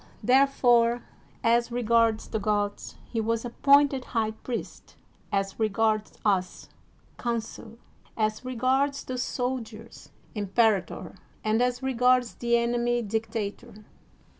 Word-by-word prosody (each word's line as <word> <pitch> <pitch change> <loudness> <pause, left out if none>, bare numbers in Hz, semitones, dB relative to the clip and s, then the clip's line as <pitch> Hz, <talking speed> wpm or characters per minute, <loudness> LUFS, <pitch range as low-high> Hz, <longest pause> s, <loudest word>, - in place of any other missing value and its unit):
There 265 +2 +5
fore, 240 -3 +3 0.4
as 235 +1 +2
regards 230 -2 +2
the 220 - -2
gods 205 -1 -2
he 230 - -2
was 230 +1 -1
appointed 275 +2 +3
high 220 -1 +1
priest, 230 +2 -7 0.4
as 195 0 -1
regards 215 0 +1
us 190 -3 0 0.5
consul, 230 -1 -4 0.4
as 215 +1 -1
regards 260 +3 0
the 255 -1 -5
sol 255 +1 -1
diers 225 0 -12 0.2
imperator, 205 -1 0 0.3
and 220 +2 +1
as 250 +1 0
regards 250 -1 +2
the 235 0 +1
enemy 240 0 0
dicta 220 -1 -2
tor. - - -17
230 Hz, 115 wpm, -27 LUFS, 220-245 Hz, 0.5 s, There